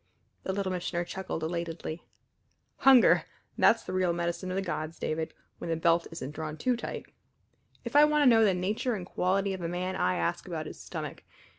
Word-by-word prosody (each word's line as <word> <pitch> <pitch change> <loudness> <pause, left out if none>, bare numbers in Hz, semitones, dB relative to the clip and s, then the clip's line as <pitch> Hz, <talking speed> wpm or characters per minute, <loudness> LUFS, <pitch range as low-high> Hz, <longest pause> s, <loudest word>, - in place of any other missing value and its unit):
The - - -3
Little 190 -1 -1
Missioner 175 -1 -2
chuckled 185 -3 -5
elatedly. 165 0 -4 0.8
"Hunger! 265 -3 +6 0.3
that's 230 - +4
the 185 - -6
real 185 -2 +2
medicine 170 +2 -2
of 185 - -2
the 195 - 0
gods, 160 -2 -4
David, 160 0 -2 0.3
when - - -5
the 165 - +1
belt 165 +1 +2
isn't 145 -4 -6
drawn 155 0 -5
too 250 +9 +1
tight. 235 - -6 0.8
If - - -6
I 295 +1 +9
want 300 0 +3
to - - +4
know 230 -3 +6
the 195 -4 +4
nature 215 +7 -1
and 185 -3 -5
quality 195 +2 0
of 190 - -6
a 170 - -2
man 180 +2 -2
I 90 0 +1
ask 85 0 -2
about - - -4
his - - -9
stomach. - - -6
180 Hz, 195 wpm, -29 LUFS, 165-195 Hz, 0.8 s, I